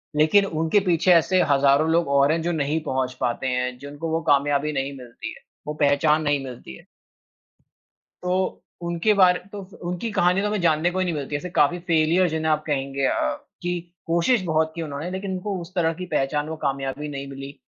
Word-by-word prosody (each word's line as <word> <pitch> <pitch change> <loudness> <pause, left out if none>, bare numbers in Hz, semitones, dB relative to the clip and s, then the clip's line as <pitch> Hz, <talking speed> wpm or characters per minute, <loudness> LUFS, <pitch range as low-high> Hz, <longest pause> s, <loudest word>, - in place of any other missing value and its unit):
लेकिन 160 +7 +4
उनके 165 +2 +1
पीछे 180 0 +3
ऐसे 180 +2 +4
हज़ारों 140 +3 +4
लोग 170 -2 +2
और 140 +1 +4
हैं 165 - 0
जो 170 +2 -1
नहीं 155 0 -1
पहुँच 130 -3 -1
पाते 120 +2 -1
हैं, 125 0 -1
जिनको 145 +4 -6
वो 165 +1 0
कामयाबी 145 +1 +2
नहीं 135 0 -2
मिलती 120 -2 -8
है, - - -15 0.3
वो 150 - -2
पहचान 150 +1 +3
नहीं 145 -2 +1
मिलती 120 - -9
है। - - -18 1.4
तो, 185 +1 -1 0.2
उनके 170 +5 +1
बारे 185 -3 +5
तो 205 - -7 0.3
उनकी 180 +6 -3
कहानी 180 0 +2
तो 205 - 0
हमें 210 -2 -1
जानने 165 0 +2
को 185 - -2
ही 185 - +1
नहीं 175 - -1
मिलती 145 0 -4
है। - - +2
ऐसे 180 - -6
काफ़ी 170 -1 +2
फेलियर 170 +1 +2
जिन्हें 160 0 0
आप 155 0 0
कहेंगे 140 -2 -1
अ, - - +1 0.5
कि 175 0 -2 0.3
कोशिश 170 +8 +2
बहुत 160 -1 +1
की 170 - -4
उन्होंने 155 +2 -5
लेकिन 190 +1 -4
उनको 190 +2 -3
उस 170 +2 -11
तरह 165 -2 +2
की 180 +3 -6
पहचान, 145 -2 -1
वो 160 - -4
कामयाबी 135 +2 -2
नहीं 140 -1 -6
मिली। 135 +1 -9
155 Hz, 205 wpm, -23 LUFS, 140-175 Hz, 1.4 s, बारे